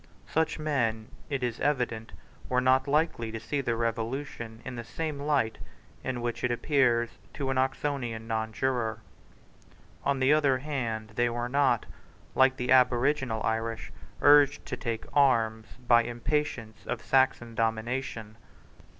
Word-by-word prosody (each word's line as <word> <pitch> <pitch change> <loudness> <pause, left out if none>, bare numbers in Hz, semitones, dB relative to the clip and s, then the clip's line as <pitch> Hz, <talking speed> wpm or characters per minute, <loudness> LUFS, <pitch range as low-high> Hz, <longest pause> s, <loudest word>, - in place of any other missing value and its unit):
Such 160 0 0
men, 120 -8 -1 0.2
it 135 -3 -2
is 120 -1 -2
evident, 125 -6 -1 0.4
were 125 - +2
not 130 +1 +3
likely 145 -6 +1
to 115 - -5
see 140 +5 -2
the 120 -3 -1
Revolution 115 0 -3
in 130 - -5
the 150 +7 -4
light 140 -6 0 0.4
in 130 -2 -3
which 120 0 -3
it 125 - +2
appeared 120 -2 +2 0.2
to 135 -2 -2
an 130 - +1
Oxonian 130 -4 -2
nonjuror. 110 +1 -1 1.1
On 140 -1 +1
the 130 +3 +4
other 145 -4 +3
hand 120 -6 -3
they 120 0 +3
were 120 +1 -3
not, 135 -3 +2 0.5
like 130 0 +4
the 125 +1 -2
aboriginal 125 -1 +3
Irish, 115 0 -2 0.3
urged 145 -1 +6
to - - -4
take 115 -2 -4
arms 115 -6 +3 0.2
by 120 -1 +7
impatience 120 -1 -3
of - - -3
Saxon 130 -3 +2
domination. 115 -1 -2
125 Hz, 135 wpm, -28 LUFS, 115-135 Hz, 1.1 s, by